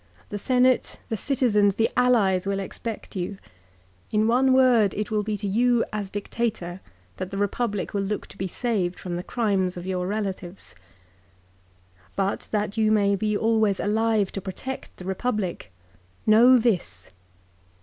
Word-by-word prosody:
The 205 - -4
Senate, 255 +2 +2
the 225 - -1
citizens, 210 -5 +2
the 225 +1 +3
allies 205 -7 +3
will 195 0 0
expect 210 +3 -6
you. 190 +2 -3 0.7
In 215 0 +2
one 255 +3 +4
word 250 -6 +4
it 210 +2 -3
will 215 -1 +1
be 210 0 -2
to 205 - -6
you 240 +3 +2
as 205 -2 -3
Dictator 200 -3 -3 0.4
that 185 0 -4
the 195 - -5
Republic 205 +1 -1
will 200 - 0
look 200 +1 -3
to - - -14
be 190 - -1
saved 190 -4 -2
from 175 -2 -4
the 175 - -3
crimes 190 -4 0
of 175 - -6
your 180 -1 -2
relatives. 195 -3 -4 0.7
" 90 0 -33
But 195 0 -1
that 210 0 -2
you 215 -1 +3
may 200 -2 +3
be 210 +1 0
always 220 -3 +2
alive 215 -1 +1
to 195 - -5
protect 255 +8 -7
the 180 - -10
Republic, 190 - -2 0.5
know 240 +4 +7
this. 175 - -1
205 Hz, 160 wpm, -25 LUFS, 190-225 Hz, 0.7 s, know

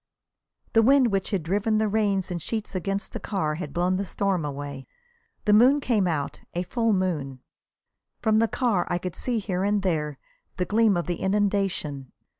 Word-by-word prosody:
The 225 - +6
wind 260 0 +5
which 195 -1 0
had 195 -6 -1
driven 205 +6 +1
the 215 0 +2
rain 205 -2 +1
in 175 -1 -3
sheets 215 +6 -4
against 195 +2 -3
the - - -4
car 170 -7 -1
had 150 -2 -5
blown 180 +4 +1
the 200 - -1
storm 195 -3 -1
away. 140 -2 -6 0.6
The 210 - +4
moon 255 +7 +6
came 225 -8 +1
out, 150 -5 -2 0.2
a 175 - 0
full 230 +5 0
moon. 160 -9 -1 0.8
From 220 -1 +3
the 230 - +3
car 225 -7 0
I 175 - +1
could 180 -1 -5
see 245 -2 -1
here 190 -3 -2
and 205 0 +1
there 150 -6 -1 0.4
the 180 - 0
gleam 215 -1 +3
of 175 - -1
the 175 -1 -2
inundation. 190 -9 -1
195 Hz, 185 wpm, -25 LUFS, 175-215 Hz, 0.8 s, The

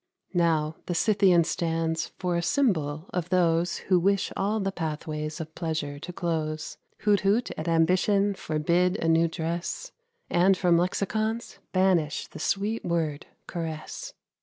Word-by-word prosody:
Now, 160 -3 +1
the 175 - -1
Scythian 195 -3 +4
stands 165 -1 -1
for 180 -2 -1
a 170 - +1
symbol 165 - +1
of 180 -1 -2
those 170 -1 +2
Who 185 -2 +5
wish 195 +2 +1
all 210 +3 0
the 195 -1 -1
pathways 155 -2 -4
of 160 -1 -6
pleasure 155 -4 -3
to 180 - -7
close; 155 -3 -3 0.2
Who'd 205 -1 +4
hoot 205 +5 +1
at 155 - -5
ambition, 185 +5 +3
forbid 175 +3 +1
a 165 - -1
new 165 +1 +4
dress, 165 +1 -4 0.4
And 185 +2 +4
from 175 -2 +3
lexicons 215 +6 -1
banish 185 -6 +2
the - - -11
sweet 210 +3 -1
word, 160 -4 -1 0.2
caress. 165 - -6
170 Hz, 140 wpm, -27 LUFS, 160-195 Hz, 0.4 s, Who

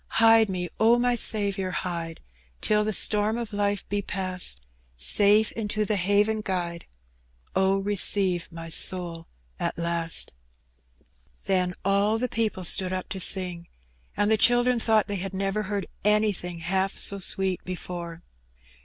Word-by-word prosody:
Hide 225 -1 +5
me, 180 -2 -3
Q 230 +2 +4
my 245 0 +1
Saviour, 200 -5 +2
hide, 170 -3 -5 0.4
Till 210 0 +1
the 215 - -2
storm 210 +2 +4
of 230 -2 -6
life 205 0 -2
be 205 0 -2
past; 185 - -2 0.4
Safe 205 - +4
into 215 -1 -3
the 210 - 0
haven 205 +3 +1
guide:.. 175 -4 -4 0.7
Oh, 190 +1 +2
receive 195 -3 +1
my 165 0 -9
soul 170 0 +1 0.3
at - - -3
last." 170 -1 -2 1.1
Then 180 -2 0
all 200 +2 +1
the 250 +2 -2
people 220 -5 -2
stood 185 +2 +4
up 185 0 -5
to 195 - -6
sing, 180 -2 +2 0.5
and 205 +1 +1
the 220 - +3
children 245 +2 +3
thought 220 -2 +2
they 205 -1 -3
had 190 +1 -6
never 195 +2 -2
heard 200 -2 -2 0.2
anything 205 -5 0
half 190 +3 -1
so 200 - 0
sweet 190 -1 0
before. 175 -2 -7
195 Hz, 145 wpm, -25 LUFS, 180-210 Hz, 1.1 s, Hide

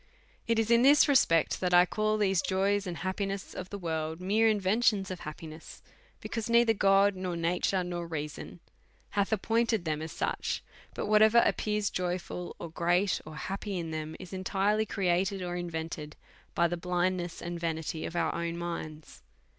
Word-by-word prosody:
It 230 -1 +2
is 225 0 +1
in 235 0 +6
this 285 +3 +6
respect 165 - +3
that 180 -1 0
1 175 0 +7
call 215 +3 0
these 195 -4 +2
joys 195 +1 0
and 175 -2 -4
happiness 195 +1 -3
of 185 0 -7
the"world 160 -4 -3
mere 215 +5 +3
inventions 205 -1 +2
of 185 - -5
happiness, 155 +1 -9 0.4
because 225 -1 -4
neither 235 -1 +5
God, 195 0 +4
nor 185 -1 -3
nature, 180 +2 0
nor 175 -1 -4
reason, 155 +1 -6 0.5
hath 200 0 0
appointed 225 -1 +1
them 155 -1 -1
as 160 0 -5
such; - - -2 0.3
but - - -3
whatever 215 +2 +5
appears 210 -1 0
joyful, 180 0 -3
or 170 - -7
great, 175 +2 +1
or 155 - -8
happy 195 +4 -4
in 165 -2 -4
them, 155 0 -4
is 185 0 -10
entirely 200 +3 0
created 190 0 0
or 175 0 -3
invented 160 -3 -5 0.4
by 170 - +4
the 175 - -2
blindness 180 0 -1
and 170 0 -5
vanity 160 -1 -3
of 170 - -5
our 175 - +1
own 170 0 -3
minds. 160 -3 -6
185 Hz, 165 wpm, -30 LUFS, 170-205 Hz, 0.5 s, 1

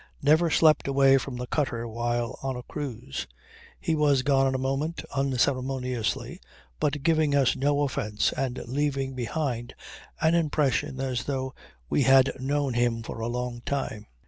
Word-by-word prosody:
Never 160 +4 +4
slept 155 -1 +4
away 135 0 +5
from 130 0 -6
the 125 - -4
cutter 120 -4 -1
while 120 +1 -2
on 135 -1 -2
a 125 - -6
cruise. 120 - -5 0.5
He 165 - -1
was 145 -4 +3
gone 135 -1 +3
in 130 - 0
a - - +1
moment, 135 +5 -2
unceremoniously, 130 -3 -1 0.4
but 145 -1 -1
giving 155 -2 +3
us 135 -3 +3
no 145 +2 +1
offence 105 -6 0
and 130 -2 -2
leaving 135 +1 -1
behind 125 -1 -3 0.4
an 160 +1 +3
impression 150 -5 +1
as 130 -3 -2
though 130 -2 -2 0.3
we - - +1
had 135 0 +6
known 140 0 0
him 120 -1 +1
for 115 - -7
a 115 - -2
long 120 0 -3
time. 135 -7 -3
135 Hz, 155 wpm, -27 LUFS, 125-145 Hz, 0.5 s, had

